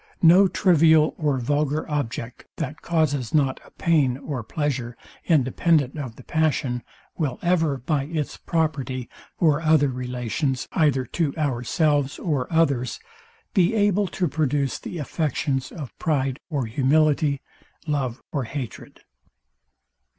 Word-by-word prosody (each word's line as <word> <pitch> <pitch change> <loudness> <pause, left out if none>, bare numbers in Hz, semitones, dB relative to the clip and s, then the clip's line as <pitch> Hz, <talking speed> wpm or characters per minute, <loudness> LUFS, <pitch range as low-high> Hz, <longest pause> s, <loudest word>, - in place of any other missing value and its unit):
No 180 +4 +7
trivial 160 -4 +4
or 145 -4 +1
vulgar 145 +4 0
object, 125 -5 -4
that 150 +4 -5
causes 150 -6 0
not 135 -3 +2
a - - -17
pain 145 -7 +1
or 140 -2 -4
pleasure, 125 -1 -3 0.3
independent 150 -1 +2
of 130 -7 -5
the 130 - -13
passion, 140 -6 0 0.4
will 140 -6 -1
ever, 165 -5 +2
by 140 +2 -1
its 155 -1 -3
property 140 -7 -2 0.3
or 155 -2 +3
other 155 -3 +4
relations 125 +2 -2
either 140 -5 +2
to 155 -1 -2
ourselves 145 +1 +1
or 145 -6 -2
others, 140 -7 +1 0.5
be 190 +2 +3
able 205 -1 +2
to 180 0 -1
produce 145 -3 0
the 175 - -7
affections 145 -3 -2
of 145 -9 -8
pride 135 -3 0
or 140 -6 -1
humility, 145 +4 +2 0.5
love 135 -6 -2
or 140 -5 -2
hatred. 130 0 -7
145 Hz, 125 wpm, -24 LUFS, 130-160 Hz, 0.5 s, No